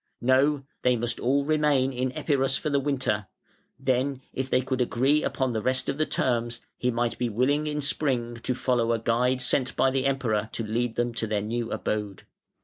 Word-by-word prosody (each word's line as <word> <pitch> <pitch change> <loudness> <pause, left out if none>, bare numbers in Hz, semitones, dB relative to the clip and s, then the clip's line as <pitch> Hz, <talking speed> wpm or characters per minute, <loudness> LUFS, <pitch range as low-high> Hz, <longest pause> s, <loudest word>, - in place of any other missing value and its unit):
No! 135 +3 +3 0.2
they 125 0 +3
must 120 0 -2
all 140 +3 +1
remain 145 -3 +2
in 130 +1 -1
Epirus 135 -2 +1
for 150 - -3
the 140 - +3
winter; 130 -8 -1 0.5
then 135 0 0
if 130 0 -3
they 130 - +3
could 130 0 -2
agree 135 +5 +2
upon 130 -3 -1
the 110 - -1
rest 130 +3 0
of 140 - -2
the 155 - +2
terms 120 -1 0 0.2
he 125 - -1
might 120 0 -1
be 120 -1 0
willing 140 +7 +1
in 150 0 -2
spring 125 -5 -1
to 125 +2 -2
follow 120 -2 +1
a - - +1
guide 125 +3 +1
sent 130 0 +1
by 135 - +3
the 135 0 +1
Emperor 115 -6 0
to 115 - -3
lead 115 +2 -1
them 120 0 0
to 115 -1 -2
their 105 -1 0
new 115 +2 -3
abode. 105 -3 -3
130 Hz, 200 wpm, -26 LUFS, 120-135 Hz, 0.5 s, No